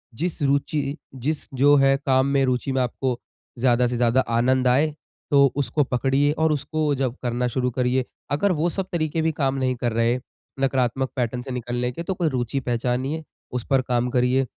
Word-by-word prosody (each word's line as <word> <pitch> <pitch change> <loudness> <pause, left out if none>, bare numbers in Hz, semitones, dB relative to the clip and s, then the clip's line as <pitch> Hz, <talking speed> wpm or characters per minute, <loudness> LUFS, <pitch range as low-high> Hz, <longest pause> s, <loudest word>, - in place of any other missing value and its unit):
जिस 170 +5 -3
रुचि 140 +1 0 0.2
जिस 145 +5 -3
जो 140 +2 +5
है, 135 -1 +5
काम 135 -1 +2
में, 140 -1 +2
रुचि 130 +1 -1
में 130 0 +1
आपको 125 0 -2 0.4
ज़्यादा 125 0 +3
से 120 0 -2
ज़्यादा 120 +2 +3 0.2
आनंद 130 +2 +2
आए, 145 +5 +3 0.4
तो 140 -1 +6
उसको 145 +1 +1
पकड़िए 135 +3 +1
और 160 0 +3
उसको 150 +1 0
जब 130 -2 -1
करना 125 0 0
शुरू 125 +1 0
करिए। 125 +1 0 0.3
अगर 170 +8 +2
वो 170 0 +1
सब 190 +2 -2
तरीके 160 -1 -1
भी 160 0 +1
काम 135 0 +1
नहीं 130 -1 0
कर 120 - +1
रहे, 115 +2 +2 0.4
नकारात्मक 130 -1 +1
पैटर्न 125 -1 -1
से 130 +1 -7
निकलने 125 0 -2
के, 165 +7 -6
तो 190 - -2
कोई 175 -3 0
रुचि 125 0 -1
पहचानिए, 125 +5 -2 0.3
उस 125 -2 -3
पर 135 -2 +4
काम 125 -1 0
करिए। 125 +2 +2
130 Hz, 190 wpm, -23 LUFS, 125-145 Hz, 0.4 s, तो